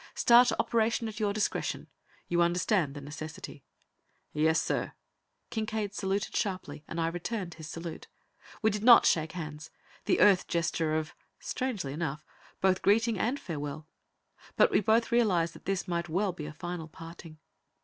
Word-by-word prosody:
Start 245 +1 +6
operation 230 0 +1
at 215 0 -7
your 210 -2 +1
discretion; 210 +1 -2 0.4
you 175 0 +1
understand 170 -3 +1
the 145 - -7
necessity." 155 +2 -8 0.7
"Yes, 160 +1 +3
sir!" - - -2 0.6
Kincaide 215 -2 -2
saluted 195 0 -2
sharply, 180 -7 -3
and 170 - -5
I 165 - +1
returned 175 +2 -3
his 160 -1 -10
salute. 165 -1 -7 0.6
We 220 - +4
did 210 +1 -3
not 240 0 +8
shake 160 -1 +2
hands, 155 -3 -7 0.4
the 360 - +2
Earth 195 -3 +5
gesture 165 -2 0
of 160 +2 -4 0.3
strangely 210 - -3
enough 155 -1 -4 0.4
both 190 -1 +3
greeting 225 +1 +3
and 250 +8 0
farewell, 150 -2 -6 0.7
but - - +5
we - - +4
both 220 +3 +2
realized 185 -9 +2
that - - -15
this 195 -1 -1
might 170 -1 -2
well 185 +3 0
be 150 -3 -7
a - - -6
final 175 +1 -6
parting. 165 0 -11
175 Hz, 155 wpm, -30 LUFS, 160-215 Hz, 0.7 s, not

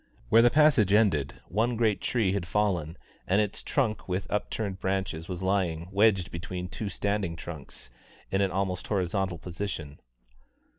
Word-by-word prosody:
Where 115 - +7
the 120 - +6
passage 140 -8 +4
ended, 85 -11 +3
one 115 +5 +1
great 110 -3 +1
tree 110 -6 +1
had 95 -3 -2
fallen, 90 -7 0 0.3
and 95 +3 +3
its 105 -1 -1
trunk 115 -8 -1
with 90 +1 -1
upturned 105 -1 -2
branches 95 -4 -2
was 90 0 -4
lying, 90 -3 0
wedged 100 -3 +3
between 90 +1 -5
two 105 +2 -4
standing 100 -4 -1
trunks, 75 -7 -9 0.4
in 95 - +2
an 100 - +2
almost 95 0 -2
horizontal 95 -2 0
position. 85 -4 -5
95 Hz, 150 wpm, -28 LUFS, 85-105 Hz, 0.4 s, Where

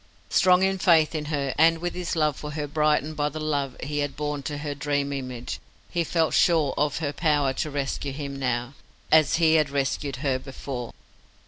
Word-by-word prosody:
Strong 185 0 +5
in 190 - +3
his - - -9
faith 165 -4 +5
in 155 -2 -3
her, 145 -3 -1
and 165 +1 +6
with 175 +2 -3
his 180 -1 -3
love 155 -3 +2
for 150 +2 -7
her 150 -1 -3
brightened 150 +1 +1
by 150 0 0
the 155 +2 -6
love 145 -4 -2
he 145 +2 -2
had 145 -1 -2
borne 150 -1 -2
to 145 +1 -4
her 145 0 -4
dream 145 0 -1
image, 125 -3 -5 0.3
he 170 -1 +1
felt 165 0 +1
sure 160 -5 +3
of 145 0 0
her 150 -3 -2
power 145 -3 +1
to 155 - -2
rescue 140 0 -3
him 140 0 -5
now, 125 0 -1 0.4
as 155 -2 +5
he 160 -1 +4
had 155 -3 +3
rescued 140 0 -1
her 130 -2 +1
before. 130 -2 -6
145 Hz, 205 wpm, -25 LUFS, 140-155 Hz, 0.4 s, and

